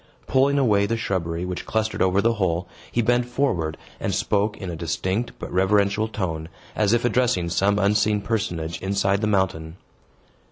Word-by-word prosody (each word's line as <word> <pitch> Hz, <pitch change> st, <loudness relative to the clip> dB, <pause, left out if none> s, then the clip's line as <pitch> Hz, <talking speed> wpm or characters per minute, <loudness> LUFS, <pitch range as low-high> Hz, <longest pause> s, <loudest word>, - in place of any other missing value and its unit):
Pulling 140 Hz, +2 st, +3 dB
away 105 Hz, -7 st, +3 dB
the 115 Hz, -, -1 dB
shrubbery 90 Hz, -5 st, -2 dB
which 90 Hz, -1 st, -5 dB
clustered 110 Hz, 0 st, -1 dB
over 95 Hz, +1 st, +3 dB
the 115 Hz, +1 st, +3 dB
hole, 90 Hz, -4 st, -1 dB, 0.2 s
he 120 Hz, -, +1 dB
bent 120 Hz, +2 st, +3 dB
forward, 105 Hz, -, -1 dB, 0.2 s
and -, -, -1 dB
spoke 105 Hz, +1 st, 0 dB
in 95 Hz, -3 st, -5 dB
a -, -, -5 dB
distinct 95 Hz, +7 st, -2 dB
but -, -, -7 dB
reverential 100 Hz, +3 st, +2 dB
tone, 80 Hz, -7 st, -4 dB, 0.3 s
as 105 Hz, -1 st, +2 dB
if 120 Hz, +1 st, +2 dB
addressing 120 Hz, -8 st, +1 dB
some 100 Hz, +4 st, +2 dB
unseen 105 Hz, +1 st, +2 dB
personage 90 Hz, -7 st, -3 dB
inside 100 Hz, 0 st, +1 dB
of 100 Hz, -, 0 dB
the 105 Hz, -, +1 dB
mountain. 95 Hz, -5 st, 0 dB
100 Hz, 170 wpm, -23 LUFS, 90-110 Hz, 0.3 s, Pulling